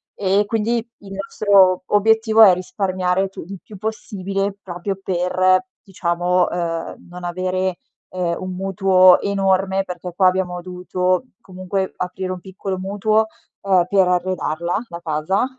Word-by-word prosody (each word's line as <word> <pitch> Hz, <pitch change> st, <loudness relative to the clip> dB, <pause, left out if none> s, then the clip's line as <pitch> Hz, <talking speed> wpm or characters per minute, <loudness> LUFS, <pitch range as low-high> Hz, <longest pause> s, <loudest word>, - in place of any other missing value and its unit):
E 200 Hz, +1 st, +2 dB
quindi 225 Hz, +2 st, 0 dB, 0.2 s
il 200 Hz, -1 st, -13 dB
nostro 195 Hz, -2 st, +3 dB
obiettivo 220 Hz, +1 st, +3 dB
è 210 Hz, -4 st, +10 dB
risparmiare 185 Hz, 0 st, -1 dB
tu 195 Hz, -, -9 dB
il 195 Hz, +1 st, -8 dB
più 210 Hz, -, -12 dB
possibile, 200 Hz, -2 st, -3 dB
proprio 185 Hz, +2 st, -4 dB
per 185 Hz, +3 st, +2 dB, 0.2 s
diciamo, 180 Hz, -1 st, 0 dB
uhm, 165 Hz, -2 st, -3 dB
non 180 Hz, 0 st, -10 dB
avere, 185 Hz, +1 st, -2 dB, 0.3 s
ehm, 175 Hz, -2 st, -2 dB
un 185 Hz, 0 st, -5 dB
mutuo 185 Hz, -1 st, +5 dB
enorme 195 Hz, -1 st, +1 dB
perché 180 Hz, -1 st, -7 dB
qua 185 Hz, 0 st, +4 dB
abbiamo 180 Hz, -1 st, 0 dB
dovuto 180 Hz, +2 st, -1 dB, 0.2 s
comunque 185 Hz, +1 st, -4 dB
aprire 185 Hz, +1 st, -4 dB
un 185 Hz, -, -5 dB
piccolo 190 Hz, +1 st, -5 dB
mutuo, 210 Hz, +3 st, +1 dB, 0.4 s
uhm, 185 Hz, -3 st, +4 dB
per 190 Hz, -1 st, +3 dB
arredarla, 180 Hz, -2 st, -1 dB
la 170 Hz, -, -7 dB
casa, 160 Hz, +7 st, 0 dB
185 Hz, 135 wpm, -20 LUFS, 180-195 Hz, 0.4 s, è